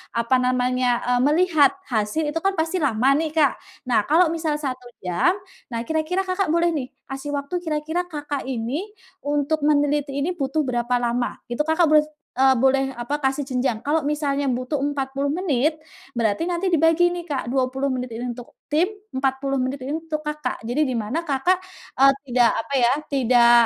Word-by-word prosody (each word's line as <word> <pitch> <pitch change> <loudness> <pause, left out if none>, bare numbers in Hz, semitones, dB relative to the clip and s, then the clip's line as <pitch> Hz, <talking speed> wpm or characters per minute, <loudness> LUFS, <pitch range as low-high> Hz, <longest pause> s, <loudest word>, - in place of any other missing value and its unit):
apa 235 +2 +2
namanya, 250 -1 +1
eee, 245 0 +2
melihat 315 -2 +4 0.2
hasil 225 +7 0
itu 300 +2 -1
kan 390 0 +1
pasti 325 +3 0
lama 265 -2 +3
nih 315 +1 -1
Kak. 305 -3 +3 0.3
Nah, 235 -4 +3
kalau 330 - +4
misal 320 -2 -1
1 260 -4 -4 0.2
jam, 180 - +2 0.4
nah 230 - -2
kira-kira 320 +5 -1
Kakak 370 -2 0
boleh 340 +1 +3
nih, 265 -4 -2 0.2
kasih 270 +2 -5
waktu 280 +5 -4
kira-kira 315 +2 -1
Kakak 295 -4 -4
ini 260 +6 -2 0.4
untuk 290 +1 0
meneliti 290 -1 +2
ini 345 +6 -1
butuh 275 -1 -1
berapa 240 0 0
lama. 240 0 -1
Itu 240 +5 -1
Kakak 320 +2 +3
boleh, 305 0 +5 0.3
eee, 265 0 +5
boleh 270 +1 +3 0.2
apa, 240 +5 -2
kasih 270 +1 0
jenjang. 250 -3 0
Kalau 295 +5 0
misalnya 285 -2 0
butuh 255 +4 -2
40 280 0 -1
menit, 310 -3 0 0.3
berarti 230 +2 0
nanti 350 +2 -1
dibagi 330 0 +4
nih 350 - -5
Kak, 270 - -1
20 260 +2 0
menit 255 -2 -3
ini 235 +2 -4
untuk 245 0 -8
tim, 310 +4 +3 0.3
40 270 +1 0
menit 260 +2 -2
ini 290 - -1
untuk 320 -1 -4
Kakak. 300 0 -4
Jadi 260 +6 +1
di 260 - -2
mana 240 +11 -2
Kakak, 295 +6 +2 0.4
eee, 275 0 +7 0.2
tidak 240 -1 +4
apa 230 - -5
ya, 240 -1 +4 0.2
tidak 245 -3 +5
280 Hz, 175 wpm, -23 LUFS, 255-310 Hz, 0.4 s, eee